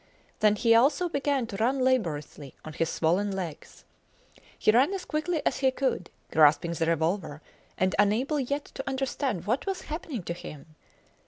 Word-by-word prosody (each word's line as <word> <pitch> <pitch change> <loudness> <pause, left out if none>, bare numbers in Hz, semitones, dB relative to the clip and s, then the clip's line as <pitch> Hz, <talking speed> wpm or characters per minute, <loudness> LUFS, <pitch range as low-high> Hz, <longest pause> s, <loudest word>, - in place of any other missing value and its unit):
Then 210 -1 +4
he 230 +2 +3
also 285 +10 +3
began 280 -4 0
to 205 -3 -7
run 255 +5 +1
laboriously 155 - -1
on 155 - -7
his 165 +2 -1
swollen 180 +6 +1
legs. 180 -6 -7 0.7
He - - +4
ran 265 - +3
as 380 - -6
quickly 310 +1 -2
as - - 0
he 265 -1 +4
could, 260 -9 -2 0.2
grasping 155 +2 +4
the 165 0 -1
revolver, 165 -1 -1 0.4
and 185 0 +1
unable 235 +9 +2
yet 280 +2 -2
to 270 - -5
understand 265 - -2
what 240 - -1
was 385 -1 -2
happening 300 - -5
to 170 - -3
him. 155 -2 -11
225 Hz, 165 wpm, -27 LUFS, 170-275 Hz, 0.7 s, Then